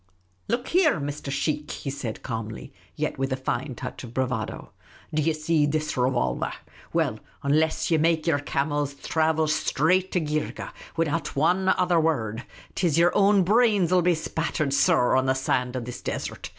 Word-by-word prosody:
" 90 0 -41
Look 240 +3 -1
here, 330 - +3
Mr. 145 0 -4
Sheikh," 150 +2 -1
he 135 - -4
said, 130 -5 -5
calmly, 115 -3 -5 0.2
yet - - -2
with 135 0 -1
a - - +2
fine 130 0 -3
touch 125 +2 -7
of 120 -1 -10
bravado; 125 -4 -2 0.2
" - - -24
do 155 - +2
ye 160 +2 +2
see 155 -1 +1
this 155 +1 -1
revolver? 125 - 0 0.4
Well, - - 0 0.2
unless 155 +4 +1
ye 160 - +4
make 160 0 +2
j'er 160 -4 +2
camels 145 0 -1
thravel 160 +1 +1
shtraight 160 +4 +1
to 180 - +3
Geergeh 155 -1 -3 0.3
widout 165 -1 -1
wan 180 +6 +2
other 180 -2 +3
wurrud, 120 -8 0 0.3
't 180 - +1
is 155 -2 +1
yer 170 +1 +5
own 200 -1 +4
brains 205 -3 +3
will 185 -1 +5
be 175 0 +3
.spattered, 160 -2 -2
sor, 140 -5 +3
on 130 0 +2
the 130 - +2
sand 125 -1 0
of 125 -2 -3
this 125 - -7
desert - - -4
150 Hz, 180 wpm, -25 LUFS, 130-170 Hz, 0.4 s, yer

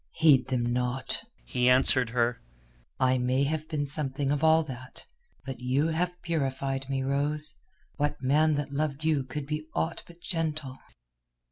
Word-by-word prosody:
"Heed 145 -5 +5
them 130 -2 0
not," 125 - -1 0.2
he 125 0 +2
answered 130 -1 +4
her. 120 0 0 0.6
"I 130 0 +3
may 130 +2 +2
have 155 +2 -2
been 150 -3 -1
something 140 -1 -1
of 145 +1 0
all 160 0 +6
that, 130 -3 -9 0.4
but 135 -3 -5
you 130 +5 +1
have 180 +2 -1
purified 135 -4 -2
me, 135 -1 0
Rose. 150 +2 0 0.4
What 145 0 0
man 150 +4 +3
that 145 -1 -3
loved 150 0 -1
you 155 -4 +2
could 135 +3 -5
be 150 +1 -4
aught 160 +1 -1
but 170 0 -15
gentle." 155 -6 -3
140 Hz, 155 wpm, -28 LUFS, 130-155 Hz, 0.6 s, all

